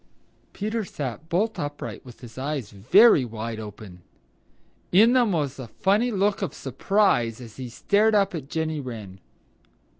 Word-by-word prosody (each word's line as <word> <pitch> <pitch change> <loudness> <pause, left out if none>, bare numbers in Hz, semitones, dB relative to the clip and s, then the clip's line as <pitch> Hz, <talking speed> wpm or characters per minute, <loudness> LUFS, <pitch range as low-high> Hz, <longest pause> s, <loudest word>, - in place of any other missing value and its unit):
Peter 215 +2 -3
sat 150 - -6
bolt 210 +6 0
upright 145 0 -5
with 125 -2 -14
his 120 -2 -11
eyes 135 -4 -4
very 140 - +5
wide 115 -1 -5
open. 105 -4 -10 0.9
In 220 +7 +6
them 245 -5 +3
was 145 -6 -2
a 130 - -6
funny 205 - +1
look 205 -1 0
of 195 - -3
surprise 135 - +1
as 115 -4 -11
he 130 -2 -6
stared 210 - +2
up 200 -2 +2
at 145 -5 -6
Jenny 160 -1 -2
Wren. 110 -8 -8
145 Hz, 150 wpm, -25 LUFS, -, 0.9 s, In